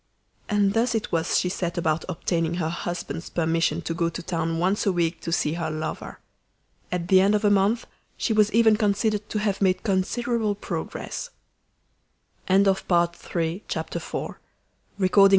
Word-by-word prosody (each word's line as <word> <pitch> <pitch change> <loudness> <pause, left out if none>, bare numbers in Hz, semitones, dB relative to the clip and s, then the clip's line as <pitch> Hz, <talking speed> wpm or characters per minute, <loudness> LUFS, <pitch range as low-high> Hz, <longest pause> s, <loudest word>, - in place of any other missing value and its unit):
And 205 -2 +3
thus 230 +2 +2
it 220 - -2
was 165 0 +1
she - - +1
set 175 -2 -3
about 160 -1 0
obtaining 165 -1 -1
her 165 -3 -1
husband's 175 0 -4
permission 165 0 0
to 165 - -2
go 170 0 0
to 170 - -7
town 165 -1 -1
once 190 +5 +1
a - - +5
week 170 -2 0
to 165 - -4
see 155 -2 +1
her 165 -1 -2
lover. 155 0 -5 0.7
At 175 -1 -2
the 190 0 +6
end 200 +2 +4
of 210 +1 0
a 205 - +5
month 205 +4 +2 0.3
she 225 - 0
was 215 -1 +4
even 220 -1 +5
considered 210 0 0
to - - -2
have 205 -2 -1
made 185 -1 +2
considerable 215 +2 0
progress. 205 - -5 1.2
Chapter 195 +1 +5
Five 175 -2 +2
She 170 +2 -2
went - - -2
on - - -4
Thursdays. 195 +1 0
185 Hz, 170 wpm, -25 LUFS, 170-205 Hz, 1.2 s, the